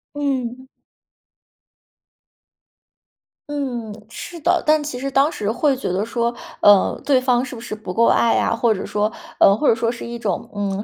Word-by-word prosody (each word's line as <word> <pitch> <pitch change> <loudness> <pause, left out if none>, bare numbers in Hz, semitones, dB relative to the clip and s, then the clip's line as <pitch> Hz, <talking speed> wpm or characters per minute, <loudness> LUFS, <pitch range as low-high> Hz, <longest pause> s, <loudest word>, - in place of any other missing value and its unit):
嗯。 260 -3 -3 2.8
嗯， 245 -7 -4 0.2
是 340 +7 -8
的， 350 +4 +2
但 310 -1 +4
其 270 -4 -5
实 275 - -3
当 275 +3 +3
时 210 -7 -3
会 270 +5 +2
觉 260 - -4
得 195 - 0
说， 235 0 -1 0.2
呃， 205 -2 +4
对 270 -3 +3
方 250 -1 +2
是 250 - -8
不 225 - -9
是 240 - -7
不 210 -4 -6
够 230 +3 +3
爱 230 - +3
啊， - - +1
或 230 -1 +2
者 190 - -5
说 210 0 0 0.3
呃 200 - +6
或 290 - +1
者 - - +6
说 230 0 -1
是 235 0 -5
一 235 0 -6
种， 205 -6 -3
嗯， 200 -1 -2
240 Hz, 190 characters per minute, -20 LUFS, 215-275 Hz, 2.8 s, 呃